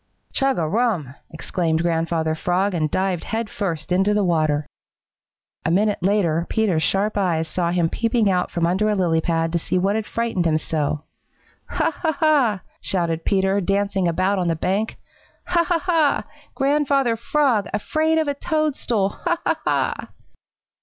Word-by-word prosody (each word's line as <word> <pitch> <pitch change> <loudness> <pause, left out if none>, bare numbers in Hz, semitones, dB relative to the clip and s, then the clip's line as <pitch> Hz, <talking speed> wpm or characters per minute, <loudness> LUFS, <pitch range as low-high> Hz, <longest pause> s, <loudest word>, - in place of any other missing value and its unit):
"Chug 270 -1 +1
a 165 -3 0
rum!" 190 - 0 0.2
exclaimed 160 0 -1
Grandfather 165 -1 0
Frog 180 +5 0
and 155 -3 0
dived 185 +1 -1
head 225 -1 -3
first 170 -5 -3
into 195 +3 +2
the 210 - +2
water. 155 -4 +1 1.0
A - - 0
minute 205 +4 +1
later 175 -4 +1
Peter's 205 -8 +1
sharp 205 +4 +1
eyes 165 -4 0
saw 170 +1 -1
him 175 -1 +1
peeping 230 +4 +1
out 180 -2 +1
from 170 -1 -1
under 190 +5 +1
a 210 - +1
lily 170 -4 +1
pad 165 -1 0
to 170 - 0
see 185 - -1
what 195 +3 +1
had 220 -1 -2
frightened 230 -7 -1
him 155 -1 +2
so. 150 -1 -2 0.7
"Ha, - - 0
ha, 320 - -1
ha!" 280 - +2 0.2
shouted 170 -3 -1
Peter, 195 0 +2
dancing 195 0 0
about 185 +4 +1
on 180 - 0
the 165 - +1
bank. 195 +7 -1 0.5
"Ha, 340 -1 +2
ha, 345 0 +1
ha! 325 -4 +1 0.3
Grandfather 275 -3 +2
Frog, 235 -3 +1
afraid 310 +9 0
of 315 -1 +1
a 285 - +1
toadstool! 285 - 0
Ha, 345 - -2
ha, - - +1
ha!" - - +1
195 Hz, 165 wpm, -22 LUFS, 170-230 Hz, 1.0 s, into